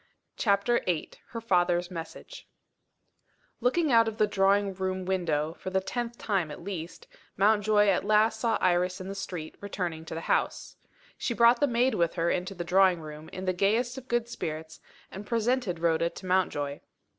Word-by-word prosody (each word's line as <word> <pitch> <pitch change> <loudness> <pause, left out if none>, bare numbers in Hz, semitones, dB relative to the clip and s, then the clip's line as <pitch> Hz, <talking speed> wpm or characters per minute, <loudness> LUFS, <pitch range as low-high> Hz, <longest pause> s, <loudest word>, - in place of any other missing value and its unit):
CHAPTER 205 +3 +2
VIII 170 -4 -1 0.2
HER 230 - -6
FATHER'S 175 -4 +1
MESSAGE 165 -2 -9 1.1
LOOKING 270 +6 +1
out 230 -1 +5
of 220 -1 -4
the 215 - +4
drawing 200 0 +2
room 185 0 -3
window, 165 -5 0
for - - -5
the 190 0 +1
tenth 240 +4 -4
time 190 -7 -1
at 150 - -9
least, 175 -3 -6 0.3
Mountjoy 210 +1 +4
at 195 -3 +2
last 215 +2 +3
saw 230 -1 +1
Iris 180 +1 +1
in 185 +1 -7
the - - -4
street, 180 -5 -6
returning 180 -5 -4
to 160 - -6
the 165 - -4
house. - - -1 0.4
She 235 - -2
brought 235 +1 +5
the 290 - +3
maid 245 +1 +2
with 170 -5 0
her 170 -1 +1
into 185 +2 -2
the 175 - -4
drawing 185 0 +4
room, 155 0 -9
in 185 - -7
the 185 - +1
gayest 225 +7 +1
of 265 -1 -9
good 240 -1 0
spirits, 160 -7 -6 0.3
and 195 - -7
presented 230 -3 0
Rhoda 165 0 +1
to 190 - -11
Mountjoy. 145 -6 0
190 Hz, 180 wpm, -28 LUFS, 175-220 Hz, 1.1 s, out